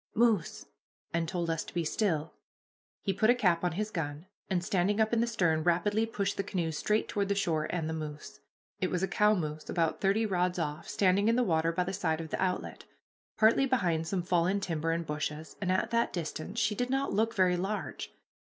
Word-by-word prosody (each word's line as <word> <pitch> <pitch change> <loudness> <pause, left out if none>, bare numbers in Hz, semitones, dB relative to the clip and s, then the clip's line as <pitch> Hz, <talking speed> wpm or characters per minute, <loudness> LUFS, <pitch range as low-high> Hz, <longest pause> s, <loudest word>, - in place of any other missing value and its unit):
moose!" 225 -6 +2 0.5
and 165 0 0
told 175 -1 -2
us 165 -1 -1
to - - -12
be 170 -1 0
still. 160 -3 0 0.7
He 195 - 0
put 215 +4 +2
a 245 - +6
cap 180 -8 +2
on 175 -2 +1
his 210 +4 -2
gun, 150 -2 -4 0.2
and, 180 -3 0
standing 205 0 +1
up 220 +1 +2
in 230 - +3
the 235 - +1
stern, 175 -9 +1
rapidly 205 +6 +2
pushed 200 -3 -2
the 195 - 0
canoe 175 -5 -2
straight 210 +8 0
toward 200 -1 -1
the 200 - +2
shore 165 -6 0
and 165 -3 -2
the 160 - -2
moose. 150 -2 -7 0.4
It 185 - 0
was 180 0 -1
a - - +2
cow 210 +2 +3
moose, 155 -4 -4
about 165 -2 0
thirty 205 +3 +2
rods 180 -3 0
off, 150 -3 -3
standing 195 +1 +3
in 230 - +4
the 250 - +3
water 165 -5 +2
by 180 +2 0
the 190 +2 -4
side 160 -5 0
of 160 -1 -6
the - - -2
outlet, 185 -1 -2 0.5
partly 230 +5 +5
behind 175 -11 +1
some 180 0 -1
fallen 180 +2 +2
timber 165 -4 -2
and 165 +1 0
bushes, 150 +1 -4
and 185 -2 0
at 185 - 0
that 235 0 +2
distance 170 +4 -5
she 210 -1 +2
did 245 +4 -2
not 270 +1 0
look 225 +2 +1
very 185 -3 +3
large. 195 +4 -3
180 Hz, 220 wpm, -30 LUFS, 165-210 Hz, 0.7 s, a